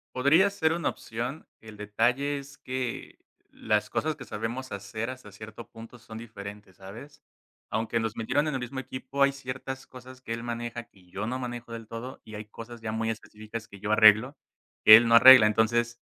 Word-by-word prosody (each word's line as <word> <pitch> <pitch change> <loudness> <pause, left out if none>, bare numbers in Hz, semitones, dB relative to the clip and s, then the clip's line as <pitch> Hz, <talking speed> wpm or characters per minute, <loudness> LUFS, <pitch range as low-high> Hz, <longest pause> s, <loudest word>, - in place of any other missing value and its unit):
Podría 150 +10 +4
ser 160 -5 0
una 170 +1 -1
opción. 120 +7 -6
El 110 -1 -12
detalle 120 +7 0
es 140 0 -11
que, 130 -2 -5 0.3
las - - -1
cosas 155 0 -1
que 130 - -9
sabemos 120 +5 -5
hacer 100 +4 -5
hasta 130 -5 -9
cierto 110 +3 -11
punto 115 +2 -12
son 110 -1 -11
diferentes, 105 -3 -10
¿sabes? 115 +10 -12 0.5
Aunque 115 +1 -1
nos 115 0 -3
metieron 125 +6 0
en 150 - -2
el 130 - -2
mismo 125 +2 -5
equipo, 130 +2 -2
hay 140 - +4
ciertas 130 0 -7
cosas 130 0 -13
que 115 - -5
él 115 0 -6
maneja, 120 0 -5
que 95 -5 -24
yo 100 +4 -5
no 125 +2 -2
manejo 120 -2 -6
del 115 -1 -8
todo 115 +4 -8
y 110 - -10
hay 105 - -6
cosas 115 +2 -11
ya 110 -1 -4
muy 110 0 -1
específicas 110 0 -7
que 100 - -13
yo 105 +2 -3
arreglo 110 +5 +6 0.5
que 110 - +12
él 115 +1 +2
no 115 - +5
arregla. 125 -2 +10
Entonces, 120 +2 +1
115 Hz, 195 wpm, -27 LUFS, 110-130 Hz, 0.5 s, que